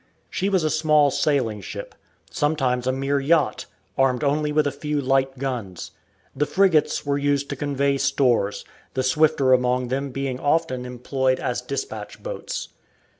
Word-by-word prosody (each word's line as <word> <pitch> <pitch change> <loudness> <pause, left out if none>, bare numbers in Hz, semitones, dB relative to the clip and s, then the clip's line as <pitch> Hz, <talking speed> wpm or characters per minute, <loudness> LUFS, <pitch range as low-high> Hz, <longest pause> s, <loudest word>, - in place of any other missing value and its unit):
She 195 - 0
was 190 -4 +2
a 155 - +1
small 150 -2 +3
sailing 125 -10 0
ship, - - -7 0.4
sometimes 130 -5 0
a - - +3
mere 135 +2 0
yacht, 150 -3 +1 0.3
armed 135 0 +2
only 150 +1 +1
with 150 0 +2
a 145 - +1
few 150 +2 -3
light 135 0 +1
guns. 120 -9 -4 0.4
The 145 +2 0
frigates 170 -2 +2
were 140 0 0
used 140 0 0
to - - -2
convey 140 0 0
stores, 120 -9 +1 0.3
the 130 - 0
swifter 135 0 +3
among 125 0 +1
them 135 +2 -2
being 135 -1 -3
often 130 -4 0
employed 130 +1 -1
as 125 -2 -2
dispatch 140 +3 -6
boats. - - -5
140 Hz, 155 wpm, -23 LUFS, 130-150 Hz, 0.4 s, small